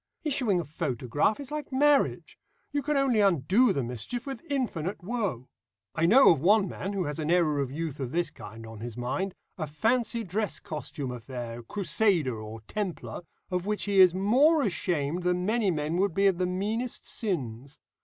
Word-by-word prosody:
Issuing 255 - +1
a - - -2
photograph 145 - -1
is 280 0 -8
like 300 -2 -5
marriage: 285 +2 +2 0.3
you 290 0 0
can 300 0 0
only 265 -5 +3
undo 195 - +4
the 140 -8 -1
mischief 125 - -4
with 270 -1 -6
infinite 200 - -2
woe. 190 - -2 0.5
I 165 0 +2
know 260 +8 +8
of 160 - +2
one 200 +3 +4
man 195 +3 -5
who 195 -2 -1
has 150 -1 -4
an 155 0 -2
error 165 -4 +3
of 140 -2 -1
youth 155 -1 -4
of 130 -3 -3
this 175 +2 0
kind 115 +2 -10
on 110 -1 -10
his 120 +1 -7
mind 175 +11 -2 0.2
a 155 - -2
fancy 230 - 0
dress 210 +2 -2
costume 145 -3 -5
affair, 120 -1 -6
Crusader 180 - +1
or 110 +1 -8
Templar 190 - -4 0.3
of 180 +1 -1
which 210 0 -1
he 200 -1 +2
is 185 -2 +7
more 270 - +4
ashamed 170 - -1
than 180 0 0
many 220 -1 +2
men 155 0 -1
would 190 -2 +1
be 195 - +3
of 190 -3 +3
the 180 - +1
meanest 215 +7 -3
sins. 140 - -4
180 Hz, 185 wpm, -28 LUFS, 145-220 Hz, 0.5 s, know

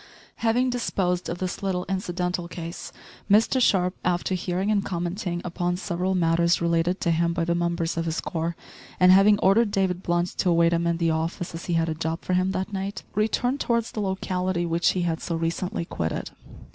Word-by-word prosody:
Having 245 +2 +2
disposed 185 -7 -1
of 170 - -3
this 185 0 -4
little 185 -2 -1
incidental 180 -2 -2
case, 170 0 -7 0.4
Mr 225 +5 +4
Sharp 180 -6 +3
after 180 +1 0
hearing 185 +3 -1
and 200 -2 +2
commenting 175 -1 -3
upon 175 0 -1
several 185 0 -1
matters 170 0 +3
related 170 +2 +1
to 170 - +1
him 170 +1 +1
by 170 -1 -1
the 170 - +1
members 170 -1 -1
of 165 - -1
his 165 0 -1
corps, 165 -1 -3 0.4
and 180 0 +7
having 200 +2 +6
ordered 205 +4 +4
David 190 -2 0
Blunt 175 -1 0
to 180 - +2
await 170 0 +4
him 170 0 +1
in 170 0 +1
the 165 -1 +1
office 165 +2 -2
as 165 - -7
he 175 - -1
had 165 0 +2
a 160 - -1
job 160 +1 -3
for 185 - -1
him 185 +1 +2
that 190 +2 -3
night, 195 0 -4
returned 240 +6 0
towards 235 -3 0
the 215 - -3
locality 185 -2 -1
which 170 0 +2
he 180 - -1
had 165 -2 -1
so 170 - -3
recently 165 +1 -2
quitted. 80 - -3
180 Hz, 195 wpm, -25 LUFS, 170-190 Hz, 0.4 s, and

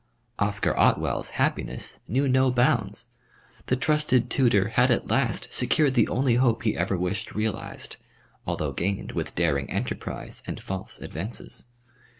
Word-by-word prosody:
Oscar 105 -1 +1
Otwell's - - +2
happiness 65 - -1
knew 135 - +1
no 130 0 +4
bounds. 120 -4 +1 0.6
The 130 - +2
trusted 130 -4 +2
tutor 105 -7 +3
had 125 +3 +3
at 120 - +1
last - - 0
secured 150 -4 +2
the 120 -4 +4
only 125 -2 +2
hope 120 -3 +2
he 110 - +1
ever 95 +2 0
wished 90 +3 -3
realised, 110 -1 -3 0.5
although - - -1
gained 100 +3 -2
with - - -4
daring 70 -5 +1
enterprise - - -4
and - - -4
false 95 0 -6
advances. 100 +9 -6
115 Hz, 140 wpm, -26 LUFS, 95-130 Hz, 0.6 s, no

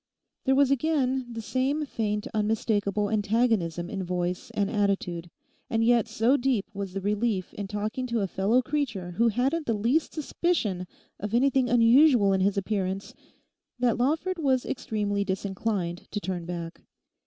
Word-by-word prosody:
There 265 -1 +4
was 275 0 +4
again 265 -3 +1
the 230 -1 -6
same 270 +6 0
faint 210 -5 -2
unmistakable 210 -1 0
antagonism 210 -6 +1
in 195 0 -4
voice 180 0 -2
and 200 -1 +1
attitude; 195 -5 -1 0.4
and 225 0 +1
yet 235 -1 +4
so 225 +5 +2
deep 245 -6 +1
was 200 -2 -5
the 195 - -3
relief 205 -1 -1
in 200 - -5
talking 215 +5 -3
to 235 -2 0
a 195 - 0
fellow 210 +8 +2
creature 240 -11 -2
who 230 +7 +2
hadn't 270 +8 0
the 230 - +1
least 240 +10 +1
suspicion 270 - -1 0.3
of 210 +3 -2
anything 260 0 +3
unusual 240 -2 +5
in 190 - +1
his 200 +1 +2
appearance 195 -1 -2 0.6
that 240 -2 +1
Lawford 320 +8 0
was 265 -5 +1
extremely 205 -5 -1
disinclined 190 -2 -3
to 205 - -3
turn 185 -4 -4
back. 170 -1 -6
215 Hz, 155 wpm, -27 LUFS, 195-255 Hz, 0.6 s, unusual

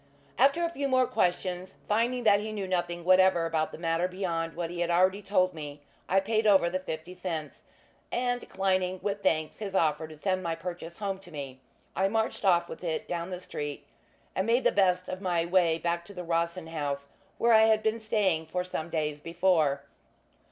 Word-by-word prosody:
After 280 +5 +4
a 335 - +1
few 285 -4 -2
more 255 -1 +4
questions, 180 -5 -1
finding 235 +4 +1
that 205 -2 +5
he 215 +1 -4
knew 205 -3 -4
nothing 175 -2 -2
whatever 185 -2 +5
about 160 -1 0
the - - -8
matter 165 +1 0
beyond 170 -3 -3
what 170 -1 -3
he 175 - -6
had 175 0 0
already 185 +3 +3
told 185 -2 +2
me, 150 -2 -7 0.3
I 195 - +5
paid 220 +2 +1
over 190 -4 +5
the 185 - -1
fifty 165 -1 -6
cents; 165 -5 -5 0.5
and, 245 0 0
declining 185 -1 0
with 200 0 -2
thanks 155 -4 0
his 200 -3 -5
offer 155 -2 +2
to 155 - -11
send 185 +4 -1
my 165 -2 -2
purchase 170 -1 -7
home 195 -2 -3
to 190 - -15
me, 140 -5 -7 0.4
I 190 - +2
marched 220 +2 -1
off 175 -3 +4
with - - -9
it 165 -3 -2
down 170 0 -3
the 180 -1 -5
street, 145 -5 -6 0.5
and 190 +3 0
made 240 +3 +3
the - - +4
best 185 -2 +2
of 185 +1 -5
my 175 -3 +1
way 170 -2 +3
back 170 0 -1
to 200 - -12
the 180 - -5
Rossin 170 +1 -1
House, 145 -3 -4 0.3
where 235 0 +4
I 220 0 +7
had 220 -1 +3
been 220 +1 +1
staying 195 -7 +1
for 180 +3 -2
some 175 -2 -4
days 150 -2 -2
before. 160 -5 +2
180 Hz, 200 wpm, -29 LUFS, 165-200 Hz, 0.5 s, I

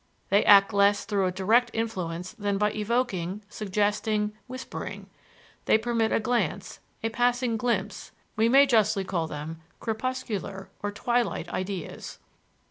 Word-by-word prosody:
They 200 +2 +4
act 200 +1 +7
less 200 0 +3
through 195 -2 +1
a - - 0
direct 220 +7 +3
influence 180 -6 -3
than 205 -3 -1
by 210 +1 +2
evoking, 210 -4 -1
suggesting, 210 +1 0
whispering; 255 +1 -7 0.5
they - - +5
permit 225 0 0
a - - +3
glance, 240 +2 -1 0.2
a 225 - +1
passing 245 0 +1
glimpse: 235 +2 -2 0.2
we 225 0 +3
may 275 +3 +7
justly 215 -5 +3
call 175 -4 -2
them 155 +2 -7 0.2
crepuscular 220 -5 -4
or 205 - -2
twilight 230 -5 -1
ideas. 185 -1 -5
210 Hz, 130 wpm, -27 LUFS, 195-235 Hz, 0.5 s, act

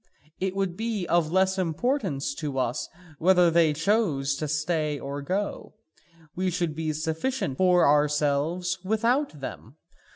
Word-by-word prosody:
It 190 0 -2
would 195 -3 -1
be 220 -3 -2
of 170 -2 +1
less 190 +1 +2
importance 185 - -1
to 145 -4 -4
us 125 -2 -1 0.3
whether 180 0 +5
they 165 -2 +4
chose 155 -4 +1
to 155 - -3
stay 155 0 -1
or 140 +1 -5
go, 195 +10 -3 0.6
we 185 +1 0
should 175 -3 -1
be 155 0 -2
sufficient 160 - -2
for 180 -2 +5
ourselves 150 +5 +1
without 230 - 0
them. 130 -1 -8
170 Hz, 135 wpm, -26 LUFS, 150-190 Hz, 0.6 s, whether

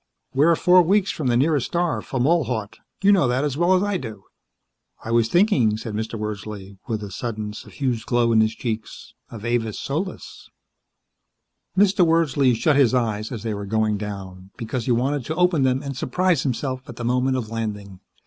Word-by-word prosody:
"We're 155 +5 +4
four 180 +2 +5
weeks 195 +3 +2
from 150 - -3
the 120 -1 +3
nearest 145 -1 +2
star, 175 -1 -1
Fomalhaut; 130 -6 -1 0.2
you 200 - +6
know 185 -9 +4
that 125 +3 0
as 145 -3 -1
well 175 +4 +3
as 185 - +2
I 205 -2 0
do." 110 - -8 0.8
"I 115 - -4
was 115 -1 +3
thinking," 145 - +3
said 110 -1 -6
Mr. 110 +2 -3
Wordsley, 105 -2 -6
with 110 -3 -3
a 100 - -7
sudden, 105 -1 -4
suffused 125 +1 -4
glow 120 -1 +2
in 110 -1 +5
his 110 0 +1
cheeks, 110 -3 -5 0.2
"of 115 -1 -9
Avis 120 -3 -1
Solis." 165 +7 -5 1.3
Mr. 195 -1 +4
Wordsley 145 -6 +3
shut 140 +6 +2
his 130 -3 +4
eyes 110 -2 -1
as 115 -4 -6
they 110 -2 -2
were 100 -1 -5
going 110 0 0
down, 95 -3 -7
because 115 0 -4
he - - 0
wanted 130 +4 0
to 160 - -3
open 180 -4 +2
them 130 +1 +1
and 140 -1 -5
surprise 175 +5 +1
himself, 130 0 -2
at - - -8
the 120 - -5
moment 125 +2 +1
of 115 -4 -4
landing. 105 -4 -5
125 Hz, 185 wpm, -23 LUFS, 110-150 Hz, 1.3 s, you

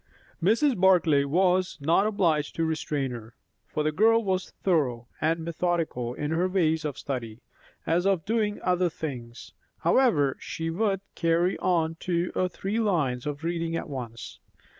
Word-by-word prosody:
Mrs. 235 - +3
Barclay 170 -7 +4
was 180 +3 +2
not 165 +8 +3
obliged 165 -8 +1
to 165 - 0
restrain 150 -4 -2
her, 115 -1 -9 0.3
for 150 - -2
the 155 - +1
girl 225 +7 +4
was 190 -2 -1
thorough 130 -10 +1
and 165 +2 +1
methodical 165 -8 -1
in 150 +2 -3
her 170 +3 +1
ways 160 -4 +1
of 150 -3 -3
study, 120 -5 -5 0.5
as 175 +3 +1
of 190 -5 +1
doing 210 -1 0
other 180 -1 +2
things; 125 -7 -7 0.3
however, 150 - +3
she 165 0 -4
would 195 +1 0
carry 170 +2 +1
on 165 -3 +1
two 175 0 -1
or 185 - 0
three 195 +5 -3
lines 150 - 0
of 145 +1 -4
reading 165 0 -2
at - - -3
once. 120 -4 -7
165 Hz, 155 wpm, -27 LUFS, 145-185 Hz, 0.5 s, Barclay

